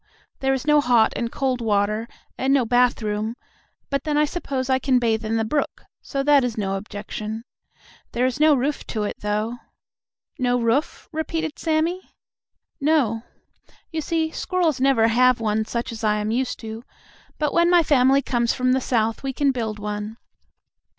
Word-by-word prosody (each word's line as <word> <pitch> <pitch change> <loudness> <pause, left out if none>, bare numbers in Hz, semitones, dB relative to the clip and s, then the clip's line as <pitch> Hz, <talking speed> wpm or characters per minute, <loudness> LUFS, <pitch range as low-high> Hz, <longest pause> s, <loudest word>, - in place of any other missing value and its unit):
There 270 0 +1
is 265 - -5
no 300 -1 +5
hot 240 -4 +3
and 235 -1 -2
cold 260 -3 -1
water 215 +1 0 0.3
and 265 +1 0
no 270 -3 +3
bathroom, 225 -2 +1 0.6
but 275 - 0
then 300 -2 0
I 300 - +4
suppose 280 -5 -3
I 260 -1 +2
can 265 -1 +2
bathe 225 -2 +1
in 220 +1 -1
the 225 - 0
brook, 290 +6 -2 0.2
so 275 -1 -3
that 285 -1 +5
is 240 -3 -2
no 195 -2 -1
objection. 210 +2 -6 0.7
There 245 +2 +1
is 260 +2 -1
no 305 -1 +6
roof 280 +3 -1
to 215 -2 -2
it, 205 - -3
though." 215 +3 -2 0.8
"No 245 -1 +2
roof?" 235 +6 0
repeated 320 0 -3
Sammie. 330 +3 -1 0.6
"No. 280 -7 +2 0.7
You 320 -1 -2
see, 320 0 -1
squirrels 330 -9 0
never 260 -4 +4
have 250 +2 +4
one 220 -1 0
such 235 +2 -3
as 225 0 -8
I 210 -1 +3
am 210 +1 -2
used 250 +2 -1
to, 225 0 -7 0.5
but 300 -1 -1
when 340 0 +4
my 350 -1 +5
family 275 -1 +4
comes 240 -2 0
from 255 -1 +1
the 260 +1 +2
South 225 -3 0
we 270 -1 -3
can 280 +1 +2
build 225 -4 -3
one. 210 +1 -5
250 Hz, 175 wpm, -23 LUFS, 220-285 Hz, 0.8 s, no